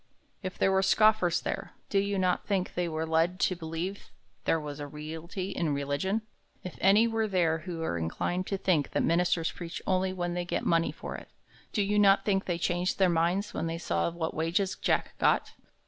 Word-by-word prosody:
If 185 -2 -5
there 195 - +3
were 190 0 +3
scoffers 195 -3 +4
there, - - -4 0.2
do 200 - +3
you 200 0 0
not 185 -1 +1
think 190 -3 0
they 175 -1 -1
were 160 0 -2
led 165 +3 +1
to 185 - +2
believe 170 +4 -5 0.4
there 165 - +2
was 150 -1 -6
a 145 - -5
reality 160 +6 -6
in 160 -6 0
religion? 145 +10 -1 0.4
If 180 - -7
any 205 +4 +6
were 225 -1 0
there 170 -5 +1
who 170 0 -6
were 85 - -1
inclined 175 - -2
to 195 - -1
think 170 -7 +1
that - - +1
ministers 170 0 +2
preach 170 -1 -6
only 185 0 +1
when 175 -2 -2
they 175 0 -1
get 175 - -2
money 165 0 +2
for - - -7
it, - - -12 0.4
do 210 - +1
you 205 +1 +1
not 200 -1 +5
think 195 -2 +1
they 175 -2 -1
changed 175 +1 0
their 190 -2 +4
minds 175 +5 +1
when 165 - -2
they 165 0 -3
saw 170 - 0
what 165 -1 -3
wages 175 +5 0
Jack - - 0
got? - - +2
180 Hz, 205 wpm, -29 LUFS, 165-195 Hz, 0.4 s, any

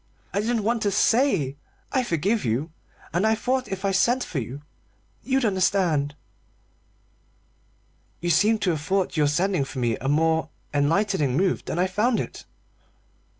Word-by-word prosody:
I - - +1
didn't 225 +1 0
want 230 +2 0
to 205 - +2
say 200 - +2 0.3
'I 260 -2 +1
forgive 200 +5 0
you,' 130 +8 -1 0.4
and 180 +6 +2
I 220 - +3
thought 255 +2 -1
if 195 -1 -4
I 195 - +2
sent 240 +7 +2
for 150 - -3
you 130 +5 -7 0.6
you'd 265 +1 0
understand." 180 -7 +1 2.0
"You 175 0 0
seem 210 +7 +4
to 180 - +3
have 155 -3 -3
thought 190 +3 0
your 150 -2 +3
sending 180 +2 +1
for 135 0 -8
me 120 -3 0
a 135 - -5
more 160 +1 +2 0.2
enlightening 150 -1 +1
move 185 +1 +1
than - - -3
I 180 - +3
found 215 +6 +1
it." - - -6
185 Hz, 155 wpm, -24 LUFS, 150-215 Hz, 2.0 s, seem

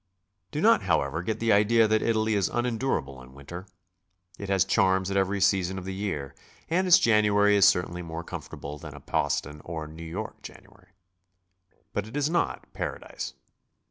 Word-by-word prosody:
Do 150 - -3
not, 225 +3 +5
however, 80 -2 0
get 110 +5 -3
the 115 -2 +3
idea 110 +2 +4
that 110 0 +2
Italy 110 -1 +1
is 100 -3 +1
unendurable 120 - -2
in 65 +1 -15
winter. 85 +8 -9 0.7
It 100 - -6
has 95 -1 +3
charms 95 -2 +2
at - - -2
every 95 +1 +1
season 95 -1 +2
of 95 - -6
the 95 - -4
year, 95 -9 -4 0.4
and 185 +3 +2
its 180 - +8
January 105 -2 +4
is 100 -1 +6
certainly 90 -2 +1
more 85 0 -6
comfortable 75 -2 -8
than 75 -3 -9
a - - -9
Boston 75 +2 -2
or 80 -2 -5
New 80 +2 -11
York 80 0 -6
January. 90 - -14 1.1
But 105 0 -2
it 115 - -6
is 145 +2 +1
not 170 -1 -1
Paradise. - - -5
95 Hz, 175 wpm, -27 LUFS, 85-110 Hz, 1.1 s, its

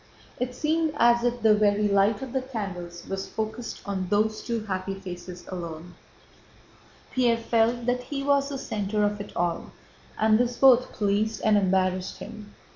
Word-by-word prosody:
It 250 0 -2
seemed 315 +2 0
as 235 -1 +4
if 245 -1 -1
the 220 -1 +6
very 210 0 +3
light 200 +3 +2
of 260 -2 -7
the 265 - +1
candles 185 -9 -6
was 195 0 -4
focused 220 +2 -5
on 190 -2 -2
those 215 +2 +1
two 230 -3 -3
happy 190 -1 -3
faces 180 -2 -9
alone. 170 -1 -7 1.2
Pierre 240 -3 +3
felt 230 +1 +1
that 250 0 +1
he 275 -1 -4
was 280 0 +2
the 280 - -4
center 210 -4 -2
of 205 0 0
it 205 - -8
all, 175 -1 -1 0.5
and 215 0 +4
this 245 0 0
both 255 -2 +6
pleased 210 +1 0
and 215 -1 +5
embarrassed 185 -1 +1
him. 210 -1 -10
215 Hz, 165 wpm, -26 LUFS, 195-240 Hz, 1.2 s, the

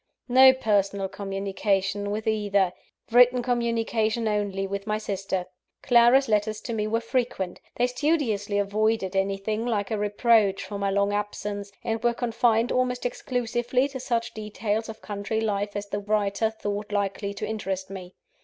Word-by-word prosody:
No 260 +1 +8
personal 200 -6 0
communication 195 0 -2
with 215 +2 -3
either 205 -4 +1 0.4
written 245 +1 +6
communication 230 -2 0
only 205 -2 -1
with 200 +1 -5
my 215 0 0
sister. 195 -3 -3 0.4
Clara's 245 +3 +5
letters 215 0 +1
to 235 - -5
me 215 -1 -1
were 225 +1 +1
frequent. 230 -6 -2
They 245 - +2
studiously 250 -7 0
avoided 205 -1 0
anything 195 +3 -1
like 220 -3 -1
a 215 - 0
reproach 210 -1 +2
for 200 -1 -6
my 200 0 0
long 200 +1 +1
absence; 205 -1 -3
and 225 -1 -2
were 240 0 +2
confined 230 -1 +1
almost 250 -1 0
exclusively 245 +1 0
to 270 -2 -6
such 235 -2 -2
details 215 +1 -3
of 220 - -9
country 205 +2 -3
life 205 -2 -1
as 205 0 -3
the 205 0 -3
writer 205 +1 0
thought 210 -1 -5
likely 200 0 -1
to - - -4
interest 195 -3 -4
me. 185 -2 -9
210 Hz, 155 wpm, -26 LUFS, 200-235 Hz, 0.4 s, No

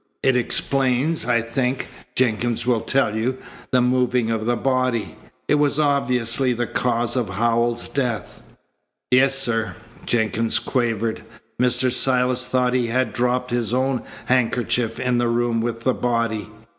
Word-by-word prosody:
It 130 - +3
explains, 130 +3 +1
I 120 -2 +2
think, 125 +2 -1 0.3
Jenkins 120 -1 0
will 120 -3 +2
tell 135 -6 +1
you, 125 +4 -1 0.3
the 125 - +3
moving 125 -2 +1
of 110 0 -2
the 120 - +2
body. 130 -2 -1 0.3
It - - +2
was 145 -1 +2
obviously 125 -3 +1
the 120 0 -2
cause 120 0 -1
of 125 -4 -1
Howells's 120 +1 0
death." 125 -6 -3 0.7
"Yes, 135 +2 +4
sir," 115 -4 -1 0.3
Jenkins 110 -1 +1
quavered. 115 -3 -1 0.4
"Mr. 125 0 +2
Silas 125 0 +2
thought 125 -1 +1
he 125 -2 +1
had 120 -1 0
dropped 125 +1 0
his 120 -1 0
own 130 -1 0 0.2
handkerchief 120 -2 0
in 125 -1 +1
the 120 - +1
room 115 -1 0
with 115 0 -3
the 130 +2 +1
body. 115 -4 -1
125 Hz, 145 wpm, -22 LUFS, 115-130 Hz, 0.7 s, Yes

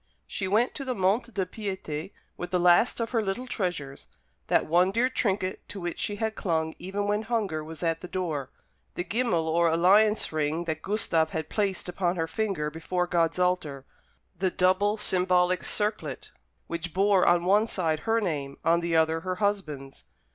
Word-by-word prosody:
She 190 - -3
went 220 +6 +2
to 280 - -5
the 255 -2 -2
Monte 210 +5 +1
de 195 -4 -1
Piété 190 -4 -5 0.2
with 175 - -6
the 180 - +1
last 180 +8 +4
of 230 -1 -2
her 230 -3 +2
little 210 +5 -3
treasures, 175 - -3 0.4
that - - +3
one 175 +4 +3
dear 235 +6 +1
trinket 190 -6 -1
to 200 - -5
which 175 -2 -4
she 205 - -1
had 220 +1 -2
clung 160 -6 -1
even 195 +3 -3
when 205 +1 +1
hunger 215 -9 -1
was 160 +2 -8
at 165 -1 0
the 180 - -7
door 165 -7 -3 0.5
the 175 - -2
gimmal 200 -7 0
or 170 +1 +3
alliance 200 +6 +4
ring 155 +2 -1
that 160 -2 -3
Gustave 170 -6 +1
had 160 -1 -3
placed 200 -4 -1
upon 180 0 -1
her 165 -2 0
finger 165 -4 -2
before 180 +3 -2
God's 170 -1 +1
altar 180 -7 0 0.5
the 185 +2 0
double 185 +4 +2
symbolic 180 -2 +2
circlet 210 0 -2 0.3
which 170 0 -5
bore 195 -1 +4
on 175 0 +4
one 205 +4 +4
side 160 -7 0
her 225 +4 +1
name, 145 -9 -3
on 170 +1 +4
the 170 -1 -1
other 160 0 +3
her 185 +2 -3
husband's. 155 - -3
180 Hz, 180 wpm, -27 LUFS, 165-205 Hz, 0.5 s, last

